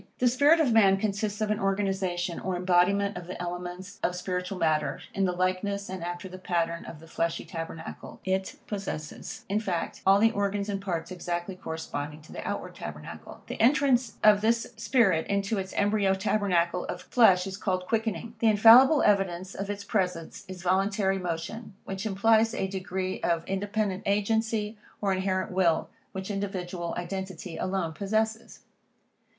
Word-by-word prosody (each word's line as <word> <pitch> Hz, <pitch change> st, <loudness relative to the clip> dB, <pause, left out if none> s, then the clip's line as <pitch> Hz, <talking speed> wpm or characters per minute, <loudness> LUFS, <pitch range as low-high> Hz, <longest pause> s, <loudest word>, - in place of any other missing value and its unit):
The 250 Hz, -, +3 dB
spirit 285 Hz, +7 st, +5 dB
of 275 Hz, -7 st, +3 dB
man 195 Hz, -3 st, +6 dB
consists 210 Hz, +1 st, -2 dB
of 215 Hz, 0 st, +1 dB
an 210 Hz, -, 0 dB
organization, 190 Hz, -3 st, -1 dB
or 185 Hz, 0 st, -2 dB
embodiment 185 Hz, +3 st, +2 dB
of 175 Hz, -1 st, -7 dB
the 185 Hz, -, -6 dB
elements 180 Hz, +2 st, -6 dB
of 180 Hz, -, 0 dB
spiritual 180 Hz, +1 st, -3 dB
matter, 155 Hz, -3 st, +1 dB
in 195 Hz, -, +1 dB
the 180 Hz, -, +1 dB
likeness 185 Hz, +3 st, -1 dB
and 185 Hz, -2 st, -5 dB
after 175 Hz, +2 st, -5 dB
the 185 Hz, 0 st, -9 dB
pattern 170 Hz, -2 st, -1 dB
of 155 Hz, -, -9 dB
the 165 Hz, -, -13 dB
fleshly 165 Hz, 0 st, -2 dB
tabernacle. 165 Hz, -1 st, -7 dB
It 190 Hz, 0 st, -1 dB
possesses, 195 Hz, -7 st, -6 dB
in 205 Hz, +2 st, +1 dB
fact, 185 Hz, -6 st, -3 dB
all 195 Hz, +1 st, +6 dB
the 225 Hz, +2 st, +4 dB
organs 200 Hz, -1 st, -1 dB
and 195 Hz, -1 st, -2 dB
parts 170 Hz, -3 st, -3 dB
exactly 175 Hz, +1 st, -3 dB
corresponding 155 Hz, -3 st, -5 dB
to -, -, -15 dB
the -, -, -6 dB
outward -, -, -4 dB
tabernacle. 75 Hz, 0 st, -9 dB
The -, -, -5 dB
entrance 255 Hz, -2 st, +3 dB
of 210 Hz, -1 st, +6 dB
this 230 Hz, +1 st, +1 dB
spirit 220 Hz, -6 st, +2 dB
into 200 Hz, +1 st, 0 dB
its 190 Hz, 0 st, -5 dB
embryo 205 Hz, -1 st, +2 dB
tabernacle 190 Hz, -4 st, +1 dB
of 180 Hz, -, -5 dB
flesh, 190 Hz, -7 st, +5 dB
is 190 Hz, 0 st, -5 dB
called 185 Hz, -3 st, -1 dB
quickening. 225 Hz, 0 st, -2 dB
The 230 Hz, -, +3 dB
infallible 235 Hz, +8 st, +8 dB
evidence 190 Hz, -2 st, +1 dB
of 195 Hz, +1 st, -5 dB
its 205 Hz, 0 st, -4 dB
presence 180 Hz, -5 st, -2 dB
is 185 Hz, -1 st, -8 dB
voluntary 195 Hz, +1 st, +1 dB
motion, 180 Hz, +5 st, -5 dB
which 195 Hz, +2 st, -4 dB
implies 220 Hz, +3 st, +3 dB
a -, -, 0 dB
degree 185 Hz, -1 st, -3 dB
of 170 Hz, -1 st, 0 dB
independent 200 Hz, 0 st, -1 dB
agency, 215 Hz, +1 st, 0 dB, 0.2 s
or 200 Hz, -2 st, +1 dB
inherent 185 Hz, 0 st, -1 dB
will, 180 Hz, -3 st, +2 dB, 0.2 s
which 190 Hz, +2 st, -5 dB
individual 185 Hz, -4 st, -3 dB
identity 185 Hz, -1 st, -5 dB
alone 185 Hz, -4 st, -2 dB
possesses. 220 Hz, +4 st, -2 dB
190 Hz, 165 wpm, -28 LUFS, 180-210 Hz, 0.2 s, infallible